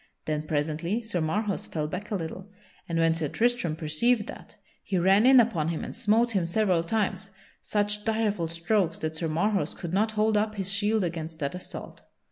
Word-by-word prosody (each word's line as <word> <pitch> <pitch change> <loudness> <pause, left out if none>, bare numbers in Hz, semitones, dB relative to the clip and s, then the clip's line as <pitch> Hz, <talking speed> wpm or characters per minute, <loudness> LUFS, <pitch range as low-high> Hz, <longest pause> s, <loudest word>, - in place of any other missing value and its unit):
Then 155 0 -2
presently 160 +9 -1
Sir 205 -6 -2
Marhaus 200 +6 -1
fell 150 -2 -2
back 185 +6 -6
a 210 - -1
little 185 +2 -5 0.4
and 165 - -1
when 165 0 +4
Sir 160 -2 -1
Tristram 230 - 0
perceived 185 +9 +1
that - - -10 0.3
he 190 - -2
ran 195 +6 +5
in 265 -1 +8
upon 195 -10 +2
him 165 -1 -2
and - - -6
smote 230 +1 +2
him 190 -6 0
several 185 -2 +2
times, 195 +1 -1 0.3
such 210 0 0
direful 215 -6 0
strokes 170 +1 0
that 155 0 -3
Sir 165 0 -2
Marhaus 195 +6 0
could 175 -1 -6
not 215 +3 +2
hold 215 0 +2
up 215 +1 0
his 195 -1 -2
shield 205 +1 +1
against 165 -2 -4
that 140 -1 -1
assault. 180 - -8
190 Hz, 190 wpm, -27 LUFS, 165-215 Hz, 0.4 s, in